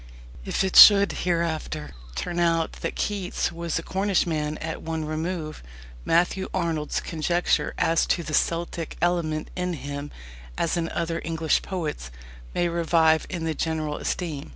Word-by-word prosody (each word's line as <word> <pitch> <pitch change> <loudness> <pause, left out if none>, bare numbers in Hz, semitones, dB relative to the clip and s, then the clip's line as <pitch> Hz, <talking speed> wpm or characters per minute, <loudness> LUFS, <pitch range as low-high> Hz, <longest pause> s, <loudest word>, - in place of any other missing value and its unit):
If - - 0
it 190 - -2
should 200 -1 +10 0.2
hereafter 160 -3 -2 0.2
turn 175 - -3
out 165 -1 +2
that - - -3
Keats 200 -3 -2
was 170 -1 -3
a 165 - -3
Cornishman 170 -6 0
at 160 0 -5
one 160 -1 -3
remove, 155 0 -4 0.4
Matthew 180 +3 +1
Arnold's 165 -4 -1
conjecture 170 +1 0
as 165 0 +2
to 170 - +1
the 155 0 -6
"Celtic 170 +1 -1
element" 165 -3 0
in 180 0 -2
him, 145 0 -5 0.5
as 170 - 0
in 165 -1 -1
other 165 0 -2
English 160 -1 +1
poets, 155 - -4 0.5
may 175 - +2
revive 165 -1 +2
in 175 -3 -4
the 160 -1 -1
general 155 -2 -2
esteem. 155 -5 -3
165 Hz, 145 wpm, -25 LUFS, 155-175 Hz, 0.5 s, should